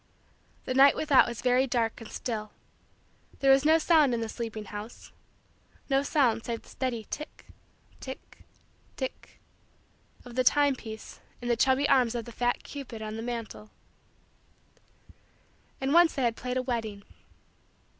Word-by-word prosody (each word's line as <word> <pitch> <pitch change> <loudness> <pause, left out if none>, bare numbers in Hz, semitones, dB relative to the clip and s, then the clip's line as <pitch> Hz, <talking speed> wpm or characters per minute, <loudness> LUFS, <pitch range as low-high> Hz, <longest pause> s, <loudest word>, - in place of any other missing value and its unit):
The 255 - -2
night 275 +2 +6
without 290 -3 +4
was 235 -2 -6
very 255 +1 +3
dark 235 -2 -1
and 225 - -9
still. 215 -3 -4 0.9
There 270 0 +4
was 270 +1 +5
no 315 +1 +6
sound 310 -6 +4
in - - -2
the 225 -1 -3
sleeping 220 -2 -5
house 210 +3 -9 0.8
no 270 0 +4
sound 250 -6 +1
save 230 -1 -4
the - - -18
steady 240 -4 -3
tick, 300 - -7 0.5
tick, 265 0 -10 0.6
tick, 260 -1 -6 0.9
of 245 - -10
the 255 +1 +1
time 285 +2 +4
piece 220 -3 -9 0.2
in 245 - -5
the 240 - +3
chubby 265 +4 +3
arms 250 -4 +3
of 235 -2 -3
the 235 - -9
fat 245 +1 -1
cupid 250 -6 -8
on 215 0 -5
the 225 - -5
mantle. 230 -2 -6 2.1
And 270 +2 0
once 345 0 +5
they 270 - -1
had 235 -2 +1
played 250 +1 -3
a 255 - 0
wedding. 225 -5 -3
245 Hz, 155 wpm, -28 LUFS, 225-270 Hz, 2.1 s, night